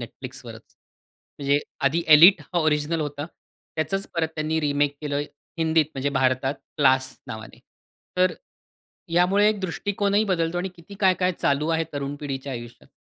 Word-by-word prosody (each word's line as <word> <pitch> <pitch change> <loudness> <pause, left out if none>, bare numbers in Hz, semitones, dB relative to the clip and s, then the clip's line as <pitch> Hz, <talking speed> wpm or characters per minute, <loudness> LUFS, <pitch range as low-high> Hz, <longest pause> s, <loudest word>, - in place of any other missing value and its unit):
Netflixवरच. - - -10 0.6
म्हणजे 140 0 +2 0.3
आधी 155 +5 +2
एलिट 165 +4 +8
हा 175 +4 -3
ओरिजिनल 155 0 +1
होता. 145 0 -4 0.5
त्याचंच 160 +5 -1
परत 165 -2 0
त्यांनी 155 +1 -1
रिमेक 145 -1 +1
केलं 145 -2 -2 0.4
हिंदीत 160 -1 +3
म्हणजे 135 +1 -1
भारतात 130 0 +1 0.2
क्लास 130 -2 +4 0.2
नावाने. 110 0 -9 0.6
तर 185 0 +4
अ, - - -10 0.8
यामुळे 190 +4 +4
एक 215 -2 -1
दृष्टिकोनही 200 +3 0
बदलतो 175 -3 0
आणि 185 +2 -2
किती 170 +4 -13
काय-काय 185 -1 +3
चालू 150 -2 0
आहे 165 0 +1
तरुण 140 0 -3
पिढीच्या 135 -1 -4
आयुष्यात 120 -1 -9
155 Hz, 145 wpm, -24 LUFS, 140-180 Hz, 0.8 s, एलिट